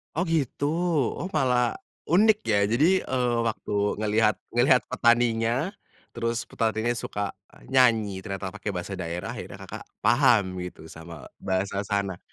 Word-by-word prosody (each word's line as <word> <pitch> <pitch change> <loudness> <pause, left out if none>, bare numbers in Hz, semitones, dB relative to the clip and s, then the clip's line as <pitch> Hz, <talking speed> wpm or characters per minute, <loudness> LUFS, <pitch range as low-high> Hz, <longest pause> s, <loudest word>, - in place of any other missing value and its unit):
Oh 175 +4 0
gitu? 155 -5 -1 0.6
Oh 185 - -4
malah 125 -4 +2 0.3
unik 210 +6 +5
ya? 105 -2 +1
Jadi, 125 +7 +3 0.2
eee, 125 -2 0
waktu 110 - -4 0.3
ngelihat 110 0 +2
ngelihat 125 +1 +4
petaninya, 120 +3 +2 0.4
terus 115 0 -2
petaninya 110 0 -1
suka 105 - -4 0.5
nyanyi 115 -7 +3
ternyata 95 -2 -4
pakai 105 +1 -5
bahasa 95 +2 -5
daerah, 85 -1 -4
akhirnya - - -8
Kakak - - -8 0.2
paham 115 -8 +3
gitu 80 -3 -10
sama 80 -2 -11
bahasa 95 +1 -2
sana. 100 -3 -2
115 Hz, 130 wpm, -26 LUFS, 100-125 Hz, 0.6 s, unik